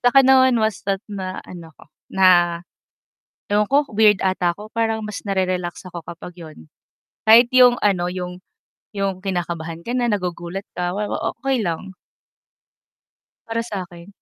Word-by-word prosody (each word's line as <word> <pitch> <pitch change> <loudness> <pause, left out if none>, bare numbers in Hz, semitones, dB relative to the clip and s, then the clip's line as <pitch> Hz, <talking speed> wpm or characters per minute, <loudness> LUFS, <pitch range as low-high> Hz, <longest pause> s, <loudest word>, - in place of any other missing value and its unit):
sa'kin 260 +2 +5
naman 260 -2 +5
basta't 200 -2 -1
na 185 -2 -5
ano 170 -2 -10
ko, - - -17 0.2
na 190 -1 +3 1.3
ewan 210 0 +2
ko, 285 +2 +3
weird 210 -2 +4
ata 180 -2 +1
ako. 210 +1 -11
Parang 225 -1 -1
mas 210 -1 -5
narerelax 185 -3 -2
ako 175 - -6
kapag 170 +1 -8
'yun. 160 -2 -11 0.7
Kahit 235 +3 +7
'yung 250 -1 +7
ano, 180 -4 +2
'yung 180 0 -5 0.5
'yung 195 -2 -2
kinakabahan 170 -3 -3
ka 240 +6 -3
na, 245 - +1
nagugulat 180 0 -4
ka, 180 0 -1
wa 210 +1 -3
wa - - -2 0.2
okey 265 -6 0
lang. 180 +3 -4 1.5
Para 230 0 -2
sa 200 -5 -5
akin. 175 0 -14
195 Hz, 150 wpm, -21 LUFS, 180-225 Hz, 1.5 s, Kahit